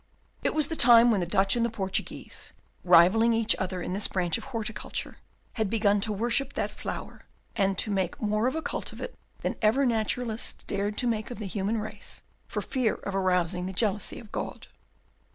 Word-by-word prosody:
It - - 0
was 305 -2 +3
the 325 - -2
time 240 -3 +7
when 210 - +2
the 175 - -1
Dutch 195 +3 +3
and 235 - +1
the 235 - +2
Portuguese, 195 -4 -4 0.3
rivalling 185 +7 +6
each 225 0 +2
other 185 -1 -3
in - - -3
this 200 +2 +1
branch 175 -3 0
of - - -5
horticulture, 225 -5 -4 0.4
had 215 - +1
begun 205 -2 +2
to 215 - 0
worship 240 +6 -1
that - - -2
flower, - - -7 0.3
and 195 -1 +1
to 210 - -1
make 190 -3 -1
more 215 +2 +1
of 260 - -1
a 320 - -2
cult - - -3
of - - -11
it - - -5 0.3
than - - -1
ever 235 +6 +4
naturalists 230 0 0
dared 205 +1 -2
to - - 0
make 220 -2 -1
of 245 - -6
the 215 - -5
human 200 +3 -1
race 215 -1 -6 0.2
for - - -3
fear 255 -5 0
of 200 - -6
arousing 180 -2 +1
the 190 - -5
jealousy 205 0 +1
of 225 -3 -12
God. - - -5
215 Hz, 200 wpm, -28 LUFS, 195-230 Hz, 0.4 s, time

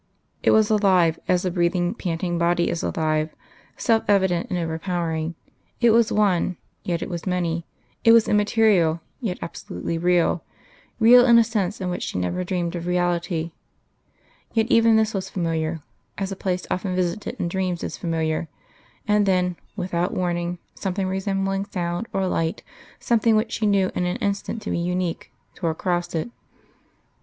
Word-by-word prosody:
It - - +2
was 220 0 +4
alive, 185 -6 +3
as 180 0 +2
a 180 - 0
breathing, 175 +1 +1
panting 175 -4 -2
body 170 0 +2
is 170 - -2
alive 155 -1 -1 0.4
self 225 -2 +2
evident 190 -4 +2
and 180 - -1
overpowering 165 -1 -2 0.4
it 235 -1 +5
was 230 0 +4
one, 190 -4 +2 0.2
yet 170 -2 -2
it - - -5
was 175 -1 -5
many; 170 -2 -1 0.4
it 230 - +7
was 230 -1 +6
immaterial, 205 -6 +3 0.2
yet 215 -8 -3
absolutely 165 - -5
real 175 -1 +2 0.6
real 245 +2 +8
in 235 -1 +7
a 230 - +7
sense 215 -3 -2
in 185 -2 -2
which 180 - -4
she - - -3
never 90 - -1
dreamed 175 -1 -2
of 170 0 -5
reality.... 175 -2 0 1.0
Yet 225 -1 +2
even 230 -1 +5
this 220 0 +2
was 195 -2 -3
familiar, 165 -2 -2 0.4
as 195 -1 -3
a - - -3
place 185 -1 -2
often 185 0 -1
visited 185 +3 -2
in - - 0
dreams 180 -1 -2
is - - -4
familiar; 160 -1 -1 0.6
and 210 -1 +3
then, 180 -1 +2 0.2
without 180 -2 -2
warning, 175 -1 -1 0.2
something 190 0 -2
resembling 195 +1 -1
sound 175 +1 -3
or 195 -1 0
light, 165 -3 -1 0.4
something 230 -1 +2
which 220 +1 +1
she 215 - 0
knew 195 -2 +2
in 180 - -1
an 180 - -1
instant 200 +2 -2
to - - -3
be - - 0
unique, 180 0 -2 0.2
tore 170 - -2
across 175 +1 -2
it.... 165 +9 -2
180 Hz, 165 wpm, -23 LUFS, 170-200 Hz, 1.0 s, real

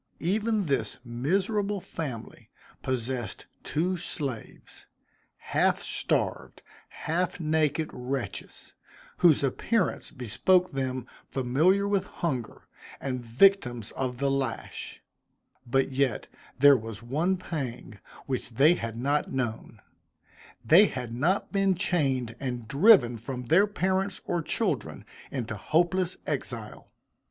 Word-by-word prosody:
Even 210 +4 0
this 140 -4 -1
miserable 195 - 0
family 135 -10 -7 0.3
possessed 125 -3 -3 0.2
two 180 +4 0
slaves, 140 -8 -6 0.5
half - - +1
starved, - - -1 0.3
half 175 +3 -2
naked 155 -1 +1
wretches, 125 +1 -5 0.4
whose 165 -5 +5
appearance 185 - 0
bespoke 175 - +2
them 130 -2 -2 0.2
familiar 155 +11 +2
with 200 -2 +1
hunger, 130 - -4 0.4
and 130 -2 -3
victims 120 - +3
of 125 -2 -3
the 140 +1 +1
lash; 135 -4 -4 0.6
but 135 +3 +1
yet 135 -1 0 0.3
there 140 +2 +8
was 115 -2 -6
one 160 +10 0
pang 130 - -5 0.3
which 130 -2 -3
they 145 +7 +6
had 115 -8 -4
not 140 +5 0
known 115 -4 -4 0.8
they 190 +7 +7
had 125 -6 -5
not 160 +11 0
been 195 -1 +2
chained 135 - 0
and 125 -4 -4
driven 140 - +6
from 125 +2 -5
their 180 - +5
parents 190 -1 -1
or 175 -1 0
children, 155 - -2 0.2
into 120 -5 -4
hopeless 175 - +1
exile. - - -4
140 Hz, 110 wpm, -28 LUFS, 125-180 Hz, 0.8 s, there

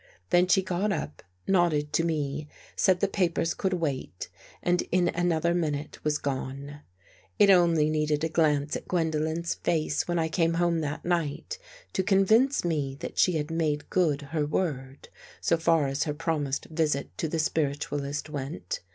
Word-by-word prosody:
Then 180 +1 +5
she 190 +1 +4
got 185 +3 -1
up, 75 - -4 0.3
nodded 165 -6 +2
to 165 - +2
me, 150 -2 -2 0.3
said 185 -1 +3
the 200 - +3
papers 175 -4 0
could 190 -1 -1
wait 140 - -3 0.3
and 175 0 +2
in 180 -1 +3
another 170 -1 +1
minute 150 -4 -3
was 150 -1 +1
gone. 140 +1 -4 0.6
It 200 - +6
only 170 -4 +4
needed 150 0 0
a - - +2
glance 150 -3 +1
at - - -6
Gwendolen's 160 -1 0
face, 155 -3 -1
when 175 0 0
I 160 -1 +1
came 165 0 +1
home 170 -1 +2
that 150 0 -4
night, 175 - -2 0.3
to - - +1
convince 215 +7 +3
me 145 -5 -1
that - - -5
she 180 - +4
had 155 0 -2
made 155 -3 -1
good 155 -6 +1
her 155 -2 +1
word, 140 -5 -3 0.3
so - - +2
far 165 -2 +2
as 135 +3 -1
her 150 -2 -2
promised 150 -3 -2
visit 155 -3 -1
to 160 - 0
the 165 - -2
spiritualist 145 -2 -1
went. 140 - -5
160 Hz, 165 wpm, -27 LUFS, 145-175 Hz, 0.6 s, It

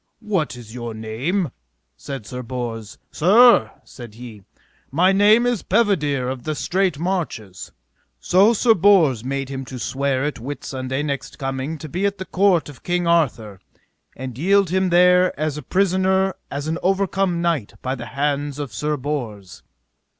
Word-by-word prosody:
What 190 -11 -1
is 115 -3 -11
your 120 -2 -6
name? 130 - -2 0.4
said 135 -6 -7
Sir 125 +3 -6
Bors. 115 -4 -6
Sir, 205 - +5
said 120 -4 -12
he, 115 -3 -10 0.5
my 175 +7 +3
name 210 +4 +5
is 245 -4 0
Pedivere 150 - +1
of 130 -1 -4
the 155 +5 -3
Straight 185 0 0
Marches. 155 - -4 0.5
So 195 - +4
Sir 230 +1 +4
Bors 165 - +4
made 135 +1 -3
him 135 -1 -5
to 130 - -8
swear 135 +1 -1
at 150 -4 -3
Whitsunday 130 +1 -4
next 140 -2 -4
coming 135 +3 -3
to 155 - -8
be 180 +7 -1
at 200 0 -4
the 190 - -6
court 185 -5 +2
of 145 -3 -12
King 175 0 -1
Arthur, 120 - 0 0.6
and 130 -1 -7
yield 195 +1 +3
him 190 0 +1
there 180 -1 +4
as 155 -1 -1
a 150 - -5
prisoner 190 +3 +1 0.2
as 140 +2 -4
an 165 +2 -2
overcome 190 -1 0
knight 165 -11 -1
by 130 - -1
the 120 -3 -7
hands 145 +1 -2
of 140 -6 -5
Sir 150 +7 -2
Bors. 120 -9 -5
150 Hz, 160 wpm, -21 LUFS, 130-185 Hz, 0.6 s, Sir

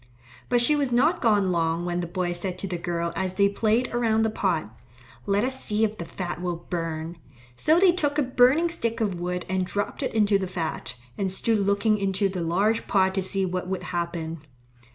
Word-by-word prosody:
But 245 -1 +4
she 300 +5 +4
was 280 -3 0
not 285 +9 +3
gone 205 -5 +3
long 165 0 0
when 175 0 -1
the 175 - -3
boy 175 0 -2
said 180 +1 -3
to 195 - -4
the 180 -2 -4
girl 170 0 -2
as 185 -1 -2
they 200 0 +4
played 220 +5 0
around 225 -2 +2
the 220 - +1
pot, 160 - -1 0.5
"Let 200 +1 +2
us 260 +1 -2
see 210 +1 +1
if 215 0 -1
the 170 - -4
fat 175 +1 -5
will 175 -1 -1 0.2
burn." 165 -1 -3 0.4
So 315 - +3
they 375 -1 +6
took 295 -5 0
a 295 - +3
burning 260 +6 +4
stick 230 -9 -2
of 200 -6 -1
wood 180 0 -3
and 185 0 0
dropped 205 +3 -3
it - - -2
into 205 -2 +3
the 190 - -2
fat, 170 -7 -4 0.2
and 195 -2 0
stood 220 +3 +1
looking 200 +2 +2
into 195 0 +1
the 185 -2 -4
large 200 +7 +1
pot 190 -1 +3
to 190 - 0
see 190 +1 0
what 180 0 -3
would 190 0 -3
happen. 170 -2 -3
195 Hz, 215 wpm, -25 LUFS, 175-225 Hz, 0.5 s, they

